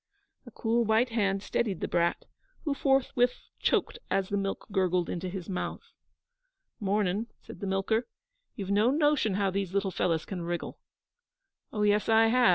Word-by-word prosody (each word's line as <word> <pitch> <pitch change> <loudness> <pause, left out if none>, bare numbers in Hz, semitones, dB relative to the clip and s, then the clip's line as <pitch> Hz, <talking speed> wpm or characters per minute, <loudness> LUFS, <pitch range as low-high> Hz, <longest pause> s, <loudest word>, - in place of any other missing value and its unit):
A - - -7
cool 235 +1 +1
white 225 +3 +3
hand 200 -4 0
steadied 200 -6 -1
the - - -2
brat, 170 0 +1 0.4
who 295 - 0
forthwith 270 -3 +2 0.2
choked - - +1
as 195 0 0
the 205 - -1
milk 195 -1 -2
gurgled 185 -3 +1
into 180 +1 -3
his 185 -1 -6
mouth. 185 -3 -4 0.9
'Mornin',' 205 +1 0 0.2
said - - -11
the 200 - -4
milker. 205 +5 0 0.5
'You've 195 -1 -4
no 210 +4 +4
notion 290 -8 +2
how 200 -1 +1
these 195 -1 -2
little 200 -1 +1
fellows 165 -2 0
can 185 -3 -5
wriggle.' 170 0 -4 0.9
'Oh, 210 -5 -1
yes, 210 +1 +2
I 225 0 +6
have.' 245 +1 +5
200 Hz, 165 wpm, -29 LUFS, 190-230 Hz, 0.9 s, I